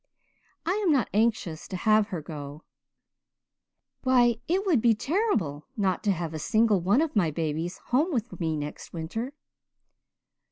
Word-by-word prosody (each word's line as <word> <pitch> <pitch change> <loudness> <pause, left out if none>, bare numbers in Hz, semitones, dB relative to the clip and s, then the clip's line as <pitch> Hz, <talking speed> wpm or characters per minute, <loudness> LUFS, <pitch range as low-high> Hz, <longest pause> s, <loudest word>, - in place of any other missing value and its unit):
I 340 - +1
am 360 - +3
not 270 -5 +2
anxious 210 -7 0
to 185 - -4
have 215 +2 +3
her 180 -8 -5
go 145 0 -8 1.4
why, 245 -3 +4
it 380 +4 +1
would 320 - +3
be 230 -1 +4
terrible 230 - -1
not 195 -3 0
to 205 - +4
have 170 -3 -3
a 155 - -4
single 215 +3 +3
one 200 - +3
of 320 -5 -1
my 180 -6 +3
babies 160 +2 -2 0.2
home 305 +8 +3
with 240 -4 -3
me 160 -3 -1
next 150 0 -7
winter. 225 - -4
210 Hz, 155 wpm, -27 LUFS, 160-245 Hz, 1.4 s, why